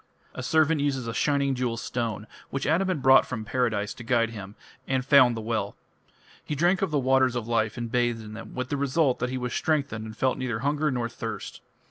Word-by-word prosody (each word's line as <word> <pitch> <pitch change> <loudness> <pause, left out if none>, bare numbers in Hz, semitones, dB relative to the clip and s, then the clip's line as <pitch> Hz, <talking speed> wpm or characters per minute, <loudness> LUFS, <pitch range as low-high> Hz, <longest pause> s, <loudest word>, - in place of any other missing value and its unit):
A - - -6
servant 155 +3 +2
uses 135 -4 -1
a 115 - -4
shining 140 +1 +1
jewel 125 -2 -2
stone, 115 -3 -3 0.2
which 135 +1 -3
Adam 170 +6 +2
had 170 -8 -2
brought 130 0 +7
from 115 -4 -5
Paradise, 110 -4 -1
to 120 - -10
guide 115 -1 +1
him, 100 -2 -9 0.3
and 130 -2 0
found 130 -4 +6
the - - -4
well. 110 -2 -2 0.7
He 150 - -4
drank 175 +5 +2
of 195 - +1
the 150 - 0
"waters 130 -1 +3
of 120 -2 -3
life" 115 -1 0
and 120 -1 -4
bathed 120 -2 0
in 105 0 -9
them, 115 - -9
with 130 +1 -3
the 145 - -1
result 140 0 +1
that 125 - -1
he 130 - -3
was 125 -1 -3
strengthened 140 -8 -1
and 110 0 -9
felt 130 +2 +1
neither 120 -3 -2
hunger 150 +3 +1
nor 120 -3 -1
thirst. 115 - -7
125 Hz, 220 wpm, -26 LUFS, 115-140 Hz, 0.7 s, brought